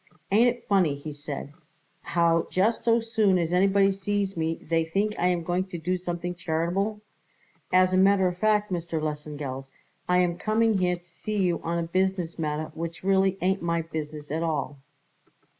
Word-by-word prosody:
"Ain't 225 +5 +5
it 240 0 -6
funny," 185 -8 +3
he 145 +2 -7
said, 145 -1 -7 0.5
"how 170 -1 +2
just 210 +5 +1
so 230 0 +4
soon 220 -4 +2
as 170 -1 -1
anybody 195 +2 +4
sees 195 0 -2
me 165 0 -1
they 165 0 -1
think 200 +6 0
I 180 - +3
am 175 -2 +1
going 180 +2 0
to 185 -2 -7
do 175 +3 -1
something 175 -1 -4
charitable? 180 +5 -1 0.7
As 185 0 +4
a - - +4
matter 190 0 +5
of 180 - -2
fact, 210 -1 +2
Mr. 170 -2 -2
Lesengeld, 150 -3 -4 0.4
I 180 - +4
am 175 -1 +1
coming 220 -1 +2
here 180 -1 +2
to 175 - -15
see 180 +5 -6
you 180 -3 +1
on 170 +1 -2
a 170 - 0
business 185 -1 -1
matter 155 0 -2
which 165 +2 -6
really 190 0 +3
it - - -18
ain't 190 +1 +1
my 170 -1 0
business 150 -2 -6
at 160 +2 -1
all." 150 -3 -2
175 Hz, 185 wpm, -26 LUFS, 165-195 Hz, 0.7 s, Ain't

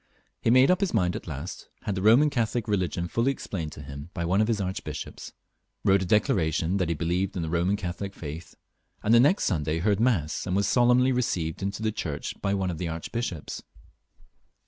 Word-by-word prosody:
He - - +1
made 130 +6 +6
up 185 - +3
his 195 -10 0
mind 90 -4 +2
at - - -6
last; 75 +3 -6
had 105 - -1
the 95 - -3
Boman 120 +9 +5
Catholic 120 -2 -1
religion 90 -4 -1
fuUy 115 +8 0
explained 90 - -2
to 75 - -9
him 70 +3 -8
by 85 -2 -2
one 95 +5 +2
of 110 - +2
his 115 -3 0
archbishops, 95 -1 -5 0.5
wrote 95 0 +5
a - - -1
declaration 90 -3 +2
that 90 -4 0
he 85 - 0
believed 90 +4 -1
in 85 - -1
the - - -3
Boman 85 +5 +1
Catholic 95 +1 -5
faith, 80 +2 -8 0.5
and 110 - +3
the 115 - +8
next 145 - +4
Sunday 80 -4 0
heard 100 +4 +1
mass, 95 -11 +1
and 90 - 0
was 100 0 +2
solemnly 125 +3 +4
received 90 -11 -1
into 100 +2 -3
the 110 - +1
church 75 -8 -4
by 100 0 +1
one 95 -2 -1
of 80 - -6
his 90 -2 -2
archbishops. 85 +1 -4
95 Hz, 205 wpm, -27 LUFS, 85-110 Hz, 0.5 s, the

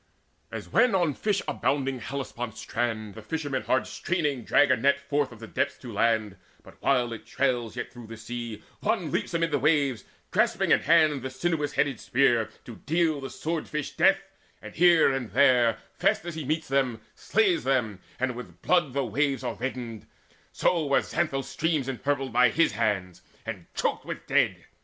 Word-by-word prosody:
As - - -6
when 250 -5 +3
on 175 -5 +2
fish 205 +6 -1
abounding 135 -2 0
Hellespont's 120 -3 -5
strand 110 -3 -2
The 110 - -10
fishermen 145 +2 -3
hard 130 - +1
straining 150 -8 -2
drag 145 +4 +4
a - - +6
net 140 +4 +2
Forth 140 -1 -1
of 115 - -11
the 115 - -8
depths 140 +5 -1
to 120 -4 -9
land; 110 -2 +1 0.3
but, - - -17
while 125 -3 +2
it 115 - -10
trails 125 -4 0
Yet 120 - -5
through 120 -2 -11
the 115 0 -9
sea, 115 -1 -6 0.2
one - - -1
leaps - - -2
amid 165 0 +1
the 145 - +1
waves 140 -5 +2 0.3
Grasping - - +2
in - - +6
hand 155 -4 +3
a 130 - -3
sinuous 150 +2 -1
headed 145 -2 0
spear 120 -3 +2 0.2
To 115 - -9
deal 160 -2 0
the 135 - -5
sword 160 0 -3
fish 150 -2 -3
death, 195 0 +3 0.4
and - - -10
here 175 -4 +5
and 130 -4 -3
there, 125 -4 +4 0.2
Fast - - +1
as 175 - -4
he 155 -2 -5
meets 155 +3 -1
them, 130 -4 0
slays 200 -5 +1
them, 120 -7 0 0.2
and 130 -1 -1
with 125 - -10
blood 175 -7 +2
The 140 -1 0
waves 135 +4 0
are 125 - -2
reddened; 120 -4 -5 0.4
so 165 -4 +1
were 140 - +3
Xanthus' 135 -6 -1
streams 155 -5 -1
Impurpled 135 0 -2
by 125 0 +5
his 165 +7 +2
hands, 100 -6 -1 0.2
and - - -6
choked - - -1
with - - -7
dead. - - +1
135 Hz, 185 wpm, -27 LUFS, 120-150 Hz, 0.4 s, a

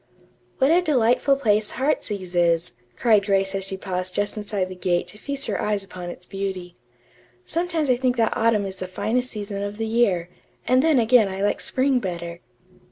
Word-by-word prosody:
"What 270 +2 +3
a 350 +2 +5
delightful 275 -3 +3
place 215 -6 +1
'Heartsease' 205 -9 -1
is," 170 -1 +2 0.2
cried 215 -4 +4
Grace 195 -1 +2
as 195 0 -2
she 195 0 -5
paused 185 -1 -3
just 205 0 -1
inside 205 -3 -2
the 185 - -8
gate 180 -1 0
to 210 - -13
feast 280 +1 -4
her - - -2
eyes 210 -2 0
upon 180 -2 -8
its 175 +1 -7
beauty. 190 -3 -5 0.7
"Sometimes 335 -2 -1
I 250 -2 +3
think 250 0 0
that 225 -1 +2
autumn 220 -2 +2
is 190 -1 -6
the 185 - -5
finest 245 +7 -1
season 205 -3 -5
of 205 +1 -4
the 225 - -2
year, 205 -7 +1 0.4
and 255 +1 +4
then 315 -1 +3
again 235 -2 +5
I 195 +1 -4
like 205 - 0
spring 265 0 +2
better." 170 -4 -5
205 Hz, 190 wpm, -23 LUFS, 185-250 Hz, 0.7 s, a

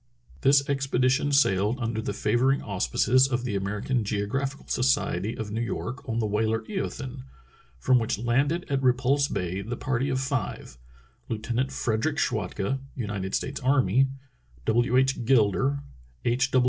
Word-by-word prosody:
This 140 +1 +4
expedition 135 0 +1
sailed 110 -4 +3
under 115 -2 -2
the - - -3
favoring 120 +6 +1
au 100 -3 -5
spices 130 - +3
of 125 -2 -1
the 120 -5 -2
American 105 +5 -1
Geographical 115 +7 -2
Society 125 -5 0
of 110 -2 -5
New 110 +2 -2
York 120 +3 -4
on 115 - -1
the 115 - +1
whaler 110 +2 0
Eothen, 130 - -5 0.6
from 125 - +3
which 110 -3 -1
landed 135 - +1
at 140 -2 0
Repulse 130 +2 +3
Bay 90 -3 -3
the 115 +4 -5
party 130 +1 -1
of 130 -1 0
five 130 - -3 0.2
— - - -34
Lieutenant 120 +4 -1
Frederick 125 +4 -1
Schwatka, 105 - -1 0.2
United 100 -5 -3
States 140 - -3
Army, 135 0 +3 0.6
W. 120 +2 +2
H. 130 -1 +2
Gilder, 135 +3 +2 0.4
H. 125 +2 +2
125 Hz, 145 wpm, -26 LUFS, 110-135 Hz, 0.6 s, This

